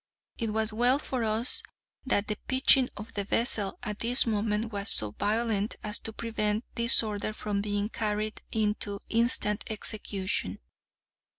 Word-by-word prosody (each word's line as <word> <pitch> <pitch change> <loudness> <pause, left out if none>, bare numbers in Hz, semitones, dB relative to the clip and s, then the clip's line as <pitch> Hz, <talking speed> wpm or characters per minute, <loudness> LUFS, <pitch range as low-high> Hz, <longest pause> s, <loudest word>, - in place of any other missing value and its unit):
It 230 -2 -1
was 220 0 0
well 245 +4 +3
for 260 -4 -3
us 220 +3 +1 0.5
that 205 -4 +1
the 210 - -3
pitching 260 0 +5
of 210 +2 -9
the 200 - -2
vessel 210 -1 +2
at 210 -1 -5
this 245 +3 +5
moment 215 0 -1
was 200 +1 -2
so 105 -1 +5
violent 215 - -1
as 210 +1 -3
to 225 - -5
prevent 220 -1 -2
this 235 0 +5
order 215 0 -3
from 205 -1 -3
being 205 0 -2
carried 215 -1 -3
into 210 -2 -1
instant 230 -2 +2
execution. 200 - -3
215 Hz, 150 wpm, -28 LUFS, 205-230 Hz, 0.5 s, pitching